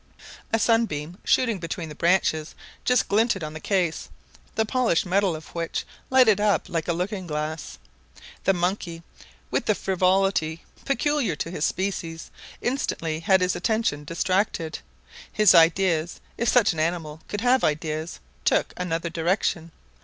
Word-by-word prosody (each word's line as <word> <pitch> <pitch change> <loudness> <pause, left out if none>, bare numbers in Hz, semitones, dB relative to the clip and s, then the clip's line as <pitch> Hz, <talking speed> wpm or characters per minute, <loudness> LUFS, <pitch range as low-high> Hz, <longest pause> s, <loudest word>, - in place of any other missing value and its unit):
A 225 - +3
sunbeam 205 -7 0
shooting 230 -6 +2
between 165 0 -5
the 150 - -8
branches 165 -1 +1 0.3
just 250 -1 +3
glinted 210 -3 +2
on 155 0 -5
the 155 - -7
case, 175 -3 -1 0.5
the 220 - +2
polished 235 -7 +1
metal 190 -1 +1
of 155 - -10
which 165 -1 -3 0.2
lighted 250 -6 +5
up 210 -1 +2
like 165 -2 -2
a 170 - +1
looking 185 +2 -3
glass. 155 0 -4 0.7
The 195 - +4
monkey, 175 -2 -2 0.5
with - - 0
the 215 - +3
frivolity 185 -4 +1 0.2
peculiar 275 - +1
to 165 - -4
his 165 -4 -1
species, 170 -4 -3 0.3
instantly 165 - -1
had 190 +3 +3
his 180 0 +1
attention 180 -5 0
distracted. 170 +1 -1 0.5
His 210 -3 +5
ideas, 170 -1 +3 0.2
if 235 - 0
such 230 -7 +4
an 160 - -5
animal 160 -1 -2
could 205 - -4
have 250 +2 +3
ideas, 155 +2 -2 0.2
took - - +2
another 170 -1 -2
direction. 170 -1 -1
180 Hz, 145 wpm, -25 LUFS, 165-205 Hz, 0.7 s, lighted